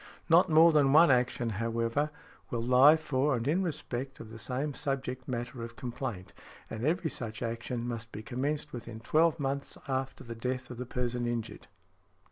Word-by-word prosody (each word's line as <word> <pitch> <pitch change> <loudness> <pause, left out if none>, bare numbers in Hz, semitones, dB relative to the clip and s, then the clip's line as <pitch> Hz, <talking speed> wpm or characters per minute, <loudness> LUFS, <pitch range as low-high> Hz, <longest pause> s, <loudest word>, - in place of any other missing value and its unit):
Not 175 +3 +6
more 165 +2 +7
than 145 -3 +4
one 160 0 +8
action, 125 -2 +1
however, 115 +6 0 0.4
will 120 -5 -2
lie 130 +6 +7
for 145 -2 +1
and 120 +1 -3
in 165 +6 +2
respect 135 -6 -4
of 110 -1 -9
the 110 - -9
same 135 +6 -2
subject 130 -2 -3
matter 120 0 -4
of 115 0 -7
complaint, 120 -6 -5 0.4
and 110 0 -5
every 160 +2 +1
such 110 -1 -5
action 115 +1 -3
must 115 -1 -5
be 110 - -7
commenced 145 +5 -2
within 115 -2 -7
twelve 160 +7 +2
months 140 0 -3
after 135 0 -3
the 115 - -7
death 125 +2 -4
of 120 - -7
the 125 0 -5
person 120 -1 -2
injured. 120 -1 -4
125 Hz, 175 wpm, -30 LUFS, 115-145 Hz, 0.4 s, one